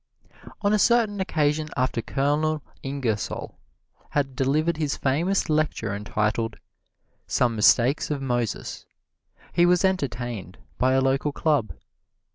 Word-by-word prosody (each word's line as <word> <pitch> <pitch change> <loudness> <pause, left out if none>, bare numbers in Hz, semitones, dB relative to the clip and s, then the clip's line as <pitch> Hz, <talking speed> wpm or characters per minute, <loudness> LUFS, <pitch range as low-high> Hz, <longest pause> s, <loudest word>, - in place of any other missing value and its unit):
On 205 +1 +3
a 215 - +3
certain 225 -3 +3
occasion 155 -3 0
after 130 -2 0
Colonel 145 +5 0 0.2
Ingersoll 130 -6 -3 0.5
had 140 -3 -1
delivered 155 +5 +1
his 150 -3 -1
famous 165 +9 +1
lecture 150 - 0
entitled, 105 +2 -1 0.7
"Some 120 -2 +1
Mistakes 120 +6 +4
of 150 -2 -1
Moses," 120 -5 -3 0.7
he 175 0 +4
was 180 +1 +4
entertained 120 - -2 0.2
by 130 +1 +3
a 135 - +3
local 135 +2 +1
club. 145 -7 0
140 Hz, 115 wpm, -25 LUFS, 120-155 Hz, 0.7 s, Mistakes